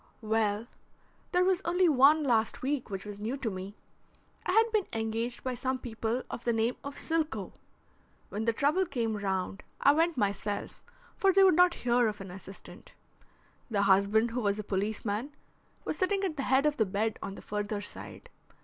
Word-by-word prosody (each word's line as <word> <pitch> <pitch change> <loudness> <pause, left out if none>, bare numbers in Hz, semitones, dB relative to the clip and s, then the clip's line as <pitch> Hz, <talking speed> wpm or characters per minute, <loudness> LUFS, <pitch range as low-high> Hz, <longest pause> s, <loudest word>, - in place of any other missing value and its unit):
"Well, 215 0 +1 0.7
there 360 0 +3
was 375 -1 +2
only 355 +1 +3
one 295 +1 +5
last 230 -4 +1
week 270 -2 -1
which 195 0 -5
was 205 -1 -7
new 230 +6 -3
to 240 -5 -2
me. 190 +2 -7 0.7
I - - +2
had 450 +2 +4
been 430 -4 +1
engaged 225 +2 -2
by 255 - -2
some 260 +2 -1
people 230 0 -3
of - - -7
the 240 - +1
name 225 +2 +1
of 280 0 -6
Silcoe. 320 -1 -2 0.8
When 215 +2 -3
the 230 - +3
trouble 300 +10 +1
came 230 -6 -1
round 195 -1 -2 0.2
I 280 - +6
went 325 +2 +2
myself, 205 -1 -2 0.3
for 390 - +3
they 390 +1 +5
would 375 - +7
not 355 +1 +5
hear 240 -1 +4
of 210 -1 -3
an 195 -2 -8
assistant. 195 +1 -11 0.7
The 205 -3 +1
husband 200 +4 +3
who 245 +2 -2
was 205 -1 +1
a 215 - -4
policeman, 210 +6 -2 0.5
was - - -3
sitting 390 +1 +1
at 360 -5 -1
the 280 - -3
head 265 +2 +4
of 300 -1 +2
the 220 - +3
bed 210 +3 -1
on 195 - -5
the - - -10
further 210 0 -3
side. 485 - -9
230 Hz, 185 wpm, -30 LUFS, 205-300 Hz, 0.8 s, would